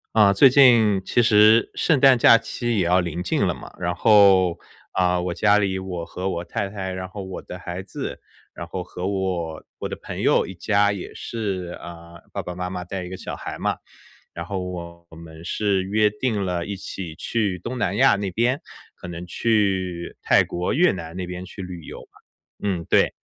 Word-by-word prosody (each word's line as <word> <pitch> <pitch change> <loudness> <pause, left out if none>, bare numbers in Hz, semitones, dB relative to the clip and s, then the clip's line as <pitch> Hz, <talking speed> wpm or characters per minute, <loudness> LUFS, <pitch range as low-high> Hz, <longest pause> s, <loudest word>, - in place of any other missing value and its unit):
啊， 105 -2 +6
最 115 +7 +7
近 120 -7 +5
其 120 - +2
实 110 0 +5
圣 160 - +2
诞 135 -2 +7
假 115 - +8
期 120 0 -3
也 95 - +2
要 90 +2 +4
临 90 0 -3
近 90 - +1
了 - - 0
嘛， - - -11
然 90 -1 -1
后， 95 -4 +5 0.4
嗯， 90 -1 +2
我 90 -1 -2
家 105 +3 +4
里 95 -2 0
我 90 -3 -5
和 90 +2 -5
我 85 -2 -3
太 95 +3 -3
太 95 -2 -5
然 95 0 -5
后 100 +2 -8
我 95 -1 -7
的 90 - -9
孩 90 0 -6
子， 95 - -6 0.3
然 85 - -7
后 90 +1 -5
和 90 0 -5
我 90 -5 -2 0.2
我 - - -3
的 - - -5
朋 - - -8
友 - - +3
一 95 - -8
家 100 +2 +2
也 100 -3 -6
是， 95 -6 -4
嗯， 85 0 -11
爸 - - -3
爸 90 - -6
妈 90 0 -4
妈 90 -1 -5
带 90 0 -5
一 - - -8
个 95 - -6
小 - - -7
孩 - - -6
嘛。 - - -1 0.6
然 85 - -6
后 100 0 -3
我 85 -1 -8
们 80 0 -12
是 100 -1 0
约 105 +2 +2
定 105 -1 -2
了 90 -2 -2
一 100 - -4
起 90 -3 -7
去 100 +1 -1
东 125 +6 -5
南 - - -1
亚 135 -5 +5
那 100 -1 -2
边， 120 +7 +1 0.4
可 - - -10
能 85 0 -7
去 95 -3 -1
泰 - - +4
国、 90 +1 -2
越 175 +5 +4
南 85 -2 -7
那 90 0 -4
边 90 +1 -7
去 95 - -9
旅 90 -2 -8
游 - - -9
嘛。 - - -22 0.5
嗯， 85 -4 -2
对。 - - +4
95 Hz, 220 characters per minute, -23 LUFS, 90-105 Hz, 0.6 s, 假